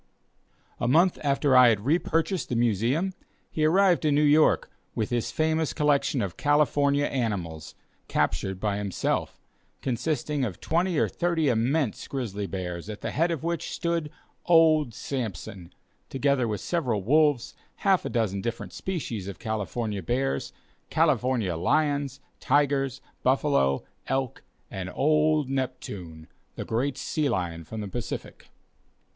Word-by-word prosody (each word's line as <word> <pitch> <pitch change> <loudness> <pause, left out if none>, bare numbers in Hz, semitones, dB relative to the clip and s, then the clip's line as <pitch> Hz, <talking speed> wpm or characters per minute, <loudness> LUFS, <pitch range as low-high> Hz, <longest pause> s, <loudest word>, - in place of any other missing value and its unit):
A 120 - 0
month 170 +8 +4
after 140 -1 +2
I 125 -1 +8
had 110 -1 0
re 160 +6 +3
purchased 170 +1 -1
the 125 - -1
Museum, 120 - +1 0.4
he 155 - +1
arrived 180 +2 +4
in 150 -2 +3
New 150 - +3
York 150 +1 +4 0.2
with 110 0 -2
his 120 -2 0
famous 160 0 0
collection 140 -4 +1
of 90 -5 -5
California 145 -1 +2
animals, 90 - -3 0.3
captured 95 +4 -1
by 100 0 -1
himself, 100 -2 -2 0.4
consisting 140 +2 -1
of 105 -8 -3
twenty 175 +1 0
or - - +3
thirty 170 -4 0
immense 125 +2 0
grizzly 105 -7 -3
bears, 90 0 -5
at 105 - -7
the - - -3
head 165 +3 +1
of 165 -3 -3
which 170 0 -2
stood 170 -3 -2 0.4
"Old 155 -7 +5
Sampson," 100 -8 -5 0.4
together 135 -2 +1
with 105 -2 -3
several 125 - -1
wolves, 145 +1 +3 0.3
half 195 -2 +4
a - - -3
dozen 105 -5 -1
different 115 +1 -5
species 120 - -4
of 100 - -6
California 110 -1 -3
bears, 130 +8 -1 0.4
California 120 -9 +1
lions, 140 - 0 0.2
tigers, 135 -2 +1 0.2
buffalo, 130 - +2 0.2
elk, 130 -1 -2 0.3
and 90 -1 -5
"Old 155 0 +3
Neptune," 105 -12 -5 0.3
the - - -5
great 130 +4 -1
sea 150 -2 -1
lion 85 -6 -2
from 110 +8 -6
the 105 - -4
Pacific. 120 +4 -6
130 Hz, 140 wpm, -26 LUFS, 105-150 Hz, 0.4 s, I